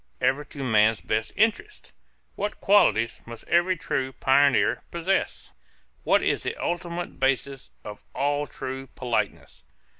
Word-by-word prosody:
Ever 140 +3 +1
to 140 -2 -8
man's 110 -3 +3
best 110 0 -2
interests? 225 - -1 0.4
What 205 +1 -4
qualities 120 - +3
must 115 -1 -9
every 175 +1 +2
true 130 -3 -2
pioneer 140 +1 +3
possess? 170 +3 -2 0.5
What - - +3
is - - +1
the - - -3
ultimate 175 0 -4
basis 135 0 -1
of 105 0 -9
all 145 +1 0
true 135 0 -6
politeness? 120 -3 -3
140 Hz, 125 wpm, -25 LUFS, 125-175 Hz, 0.5 s, man's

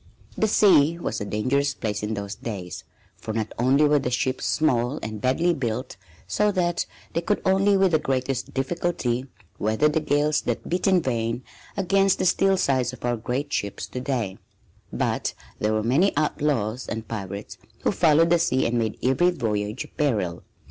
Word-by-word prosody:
The 220 - +1
sea 170 -7 +5
was 170 - -3
a - - -2
dangerous 135 +8 0
place 105 -3 -3
in 105 +1 -2
those 100 0 -4
days, 100 -5 -6 0.3
for 110 - -6
not 110 -2 -2
only 135 +5 +4
were 150 0 +4
the 130 - -2
ships 130 +1 -1
small 130 -3 +1
and 110 -1 -5
badly 165 +7 +2
built 125 -3 -3 0.3
so 210 0 +1
that 175 -2 0 0.3
they 170 - 0
could 205 +4 0
only 195 +1 +4
with 190 -2 +3
the 155 - +3
greatest 130 -2 -2
difficulty 135 -3 -1 0.3
weather 110 +8 +2
the 150 +1 +1
gales 150 0 +1
that - - -3
beat 180 +3 0
in 185 -3 +4
vain 115 -1 -1 0.3
against 195 0 +3
the 185 - -1
steel 195 +1 +3
sides 130 -7 +1
of 125 - -8
our 120 0 +1
great 125 +6 -3
ships 100 -1 -2
to 125 - -5
day, 120 -8 -2 0.5
but - - -1 0.2
there 105 - +1
were 110 0 0
many 145 - +2
outlaws 130 -6 0
and 110 0 -4
pirates 100 -2 -6 0.2
who - - +2
followed 165 -3 +4
the 175 - +5
sea 130 -5 +1
and 120 0 +1
made 110 -2 -1
every 135 +8 +3
voyage 105 -7 -2
a - - -12
peril. 105 - -1
130 Hz, 180 wpm, -24 LUFS, 115-165 Hz, 0.5 s, sea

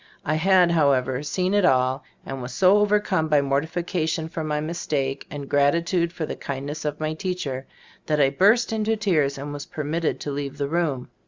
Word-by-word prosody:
I 155 - +1
had, 180 +2 +4
however, 135 -5 +2
seen 180 +5 -1
it 205 -1 +3
all, 130 -4 +2 0.2
and 135 -1 -5
was 125 0 -6
so 190 +2 +5
overcome 205 -5 +2
by 150 -1 +4
mor 140 0 +1
tification 160 -1 -2
for 165 - -4
my 150 -1 -1
mistake, 150 -4 -2
and 145 -1 -7
grati 145 +5 +2
tude 170 -1 0
for 170 -2 -4
the - - -5
kindness 140 +3 -5
of 150 0 -2
my 155 0 -1
teacher, 155 -7 -4 0.4
that 150 -1 +1
I 135 -1 +4
burst 210 - +3
into 220 0 0
tears 155 -10 +1
and 145 +1 -6
was 145 -1 -7
per 150 - -5
mitted 160 +2 -1
to 145 - -4
leave 140 -1 -4
the 140 - -1
room. 150 -5 -1
155 Hz, 200 wpm, -24 LUFS, 140-175 Hz, 0.4 s, so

